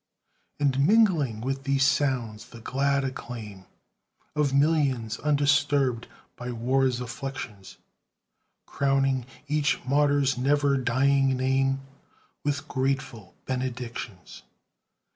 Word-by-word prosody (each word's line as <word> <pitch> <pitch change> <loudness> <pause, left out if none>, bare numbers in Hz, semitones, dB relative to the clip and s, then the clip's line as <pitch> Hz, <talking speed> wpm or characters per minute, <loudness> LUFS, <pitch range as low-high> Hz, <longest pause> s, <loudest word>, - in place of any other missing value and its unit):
And 140 -2 +1
mingling 170 - +3
with 135 +2 -3
these 135 -1 +2
sounds, 130 -6 0
the 115 - -11
glad 140 +4 0
acclaim 115 -7 -7 0.7
Of 150 -2 +1
millions 140 -6 +1
undisturbed 140 -4 +2 0.3
by 125 0 -6
war's 125 +2 +1
afflictions, 120 -5 -7 0.9
Crowning 135 -2 +1 0.2
each 150 +1 +1
martyr's 140 -1 +2
never 140 +1 +2
dying 135 +1 +2
name 135 +1 +1 0.6
With 145 0 -2
grateful 130 -6 -3
benedictions. 125 -6 -5
135 Hz, 90 wpm, -26 LUFS, 125-140 Hz, 0.9 s, mingling